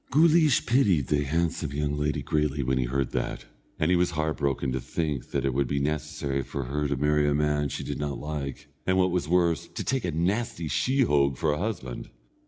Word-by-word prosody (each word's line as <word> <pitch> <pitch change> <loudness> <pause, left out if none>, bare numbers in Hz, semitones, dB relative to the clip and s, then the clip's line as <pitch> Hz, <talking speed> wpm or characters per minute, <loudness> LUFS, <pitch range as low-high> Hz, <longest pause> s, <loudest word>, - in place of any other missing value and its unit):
Guleesh 155 -1 +5
pitied 105 - +3
the 75 -1 +2
handsome 80 0 -1
young 75 0 -1
lady 75 0 -1
greatly 75 -2 0
when 65 +1 +1
he 65 - +1
heard 65 +1 -1
that, - - -3 0.3
and 80 +3 +1
he - - +5
was 90 0 +2
heart 80 -1 0
broken 70 -2 0
to 65 0 -2
think 75 0 -3
that - - -1
it 70 - +1
would 70 0 +1
be 70 - -1
necessary 75 -1 -1
for 70 +1 -4
her 75 +4 -1
to 70 -1 -1
marry 75 +1 +2
a 70 - +1
man 75 -1 +1
she - - -4
did 70 - -4
not 75 -1 -2
like, 70 -2 -5 0.2
or 95 - +3
what 95 -1 +3
was 85 -3 -1
worse, 85 -2 +2
to - - -6
take 130 -3 -1
a 90 - -1
nasty 85 +2 -1
sheehogue 75 - +2
for 80 +2 +1
a 75 - -1
husband. 85 - -4
75 Hz, 215 wpm, -27 LUFS, 70-85 Hz, 0.3 s, Guleesh